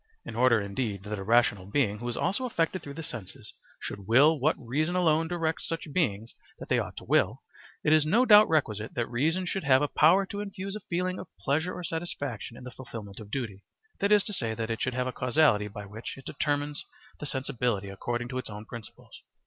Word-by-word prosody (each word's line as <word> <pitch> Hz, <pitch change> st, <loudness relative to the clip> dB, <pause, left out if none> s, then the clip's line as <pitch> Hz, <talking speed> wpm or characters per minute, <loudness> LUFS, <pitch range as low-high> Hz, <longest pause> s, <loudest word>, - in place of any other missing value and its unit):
In -, -, -7 dB
order 120 Hz, -1 st, +5 dB
indeed 100 Hz, 0 st, -3 dB
that 105 Hz, 0 st, -4 dB
a -, -, -4 dB
rational 105 Hz, -3 st, +3 dB
being 105 Hz, -2 st, +1 dB
who 120 Hz, +1 st, -4 dB
is 120 Hz, -, -3 dB
also 200 Hz, +9 st, 0 dB
affected 185 Hz, -6 st, 0 dB
through 140 Hz, -1 st, -8 dB
the 165 Hz, -, -6 dB
senses 115 Hz, -, -8 dB, 0.3 s
should 100 Hz, -2 st, -7 dB
will 145 Hz, +7 st, +6 dB
what 150 Hz, +5 st, +3 dB
reason 155 Hz, +8 st, -1 dB
alone 165 Hz, -2 st, +3 dB
directs 165 Hz, -2 st, -1 dB
such 165 Hz, -3 st, -4 dB
beings 115 Hz, -, 0 dB, 0.2 s
that -, -, -10 dB
they -, -, +3 dB
ought -, -, -5 dB
to -, -, -7 dB
will, -, -, +2 dB, 0.4 s
it 150 Hz, -, +4 dB
is 155 Hz, -1 st, +5 dB
no 220 Hz, +12 st, +3 dB
doubt 210 Hz, -2 st, +8 dB
requisite 110 Hz, -9 st, 0 dB
that 120 Hz, -, 0 dB
reason 160 Hz, +11 st, 0 dB
should 190 Hz, +2 st, -2 dB
have 135 Hz, -1 st, +5 dB
a -, -, +2 dB
power 175 Hz, +7 st, +5 dB
to 200 Hz, +1 st, -6 dB
infuse 195 Hz, -1 st, -5 dB
a -, -, -4 dB
feeling 185 Hz, +1 st, -1 dB
of -, -, -7 dB
pleasure 160 Hz, +6 st, 0 dB
or 180 Hz, -, -6 dB
satisfaction 145 Hz, -9 st, -4 dB
in -, -, -11 dB
the 125 Hz, -, -7 dB
fulfilment 110 Hz, -5 st, -9 dB
of 105 Hz, -2 st, -10 dB
duty, 105 Hz, -6 st, -4 dB, 0.4 s
that 200 Hz, +1 st, +1 dB
is 210 Hz, -2 st, +6 dB
to 210 Hz, -, -3 dB
say, 115 Hz, -, -1 dB
that 115 Hz, 0 st, -3 dB
it 115 Hz, -, -3 dB
should 125 Hz, -1 st, -1 dB
have 125 Hz, 0 st, 0 dB
a 130 Hz, -, -2 dB
causality 125 Hz, -5 st, +3 dB
by 105 Hz, 0 st, -8 dB
which 110 Hz, +6 st, -7 dB
it 135 Hz, -, -12 dB
determines 145 Hz, 0 st, -1 dB, 0.4 s
the 150 Hz, -, -4 dB
sensibility 125 Hz, -7 st, -1 dB
according 120 Hz, +5 st, -3 dB
to 130 Hz, +1 st, -3 dB
its 130 Hz, -, -4 dB
own 105 Hz, +1 st, -8 dB
principles. 115 Hz, -1 st, -11 dB
130 Hz, 220 wpm, -28 LUFS, 110-165 Hz, 0.4 s, doubt